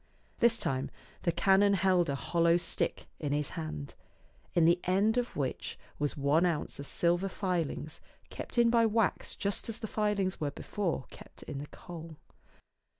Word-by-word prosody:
This 230 -1 +4
time 130 -7 -1 0.3
the 170 - +2
canon 195 +4 +4
held 185 -3 +3
a 140 - 0
hollow 170 +3 +3
stick 170 - -1
in 145 -2 -1
his 145 -1 0
hand, 75 -2 -5 0.6
in 170 - +5
the 170 +2 +5
end 200 +5 +3
of 245 0 -1
which 135 -3 -3 0.2
was 145 0 0
one 145 +4 +3
ounce 170 -5 -1
of 140 - -6
silver 175 +3 +1
filings 170 -5 -2 0.3
kept - - -6
in 235 -1 +5
by 235 -1 +5
wax 220 -2 +1
just 200 +3 -2
as 225 - -3
the 225 - -5
filings 205 -4 0
were 145 - +1
before 170 -1 -3
kept - - -13
in 135 - -6
the 145 - -6
coal. 165 -1 -10
175 Hz, 165 wpm, -31 LUFS, 150-200 Hz, 0.6 s, in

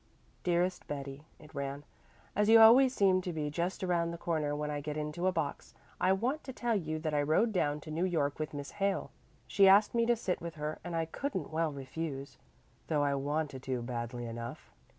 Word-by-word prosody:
"DEAREST 180 +1 0
BETTY," 140 +1 -6
it 150 - -16
ran: 140 +1 -4 0.5
"As 210 +1 +2
you 225 0 +9
always 245 +4 +8
seem 190 -6 +3
to 180 - -4
be 150 -3 -3
just 175 +5 -2
around 170 -2 +1
the 170 - -5
corner 155 -4 -1
when 150 0 -3
I 145 0 -3
get 150 +1 -4
into 150 +4 -2
a - - +4
box, 160 -5 -4 0.2
I 185 - +3
want 245 +11 0
to 265 - -5
tell 240 -2 -1
you 155 -5 -2
that 155 -1 -3
I 145 - +2
rode 160 +10 +2
down 150 -5 +1
to 155 - -9
New 165 +4 0
York 150 -6 0
with 155 - -3
Miss 145 0 -6
Hale. 195 -1 -1 0.3
She 195 -1 +4
asked 200 +2 +6
me 230 -1 +2
to 240 - +4
sit 195 -5 -2
with 170 -1 -6
her 150 0 -4
and 175 -1 -4
I 165 0 0
couldn't 185 - -4
well 160 -1 +1
refuse, 140 0 -6 0.5
though 150 -3 +1
I 140 -1 +2
wanted 145 0 -2
to 125 -2 -1
badly 120 0 -4
enough. 115 0 -7
160 Hz, 210 wpm, -32 LUFS, 145-185 Hz, 0.5 s, you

